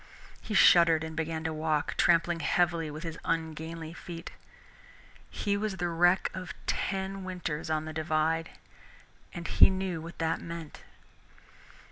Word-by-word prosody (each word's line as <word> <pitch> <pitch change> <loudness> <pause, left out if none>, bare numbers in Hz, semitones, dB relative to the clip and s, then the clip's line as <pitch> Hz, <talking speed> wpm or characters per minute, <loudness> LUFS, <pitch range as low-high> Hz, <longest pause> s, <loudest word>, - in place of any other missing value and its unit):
He 215 - -4
shuddered 170 -4 +6
and 160 0 -6
began 160 0 -2
to 160 0 -2
walk, 155 -1 0
trampling 170 0 +3
heavily 170 0 +1
with 155 +3 -7
his 165 -1 -5
ungainly 160 0 -3
feet. 170 0 -8 1.0
He 200 -1 -1
was 205 -1 -2
the 175 0 -1
wreck 175 +2 +3
of 185 -2 -6
ten 195 0 -2
winters 175 -5 -4
on 155 0 0
the 155 - -6
Divide 160 +1 0 0.8
and 170 -1 -6
he - - +7
knew 190 -3 -2
what 165 +1 -9
that 165 0 -1
meant. 165 -2 -8
165 Hz, 140 wpm, -29 LUFS, 160-175 Hz, 1.0 s, he